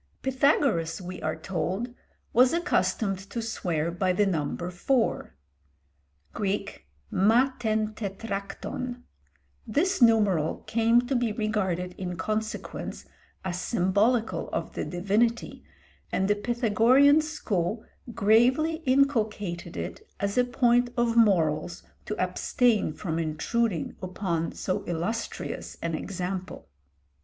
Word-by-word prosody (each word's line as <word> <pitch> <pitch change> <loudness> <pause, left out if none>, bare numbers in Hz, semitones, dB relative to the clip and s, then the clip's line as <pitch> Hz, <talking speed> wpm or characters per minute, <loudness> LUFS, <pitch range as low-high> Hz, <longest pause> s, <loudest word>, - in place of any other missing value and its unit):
Pythagoras, 265 - +2
we 180 0 -7
are 155 0 -1
told, 195 +6 -3 0.4
was 250 +4 +5
accustomed 225 - +1
to 235 - -4
swear 170 -8 -2
by 185 +2 0
the 205 +3 +3
number 175 0 -2
four, 225 - 0 1.0
[Greek: 200 - -3 0.2
ma 230 +7 +4
tên 215 -2 0
tetrakton]. 205 +4 -5 0.6
This 350 - +1
numeral 205 -9 +3
came 230 +1 +3
to 265 +2 -1
be 240 -2 +1
regarded 190 -5 -1
in 180 -2 -4
consequence 215 +2 -4 0.4
as 180 -1 -2
symbolical 220 +4 +1
of - - -3
the - - -3
divinity, 205 +6 0 0.5
and 190 - +1
the 205 - +3
Pythagorean 240 +6 +4
school 220 - -2 0.3
gravely 240 +9 +3
inculcated 215 -10 +1
it - - -5 0.2
as 200 0 -1
a 250 - +4
point 245 0 +2
of 235 -1 +2
morals 175 -6 +2 0.2
to 210 - -3
abstain 210 +3 +1
from 160 +1 -3
intruding 165 +5 -1
upon 180 -3 -2
so 190 +2 -2
illustrious 190 +8 -4
an 170 0 -3
example. 185 - -5
210 Hz, 110 wpm, -27 LUFS, 180-240 Hz, 1.0 s, was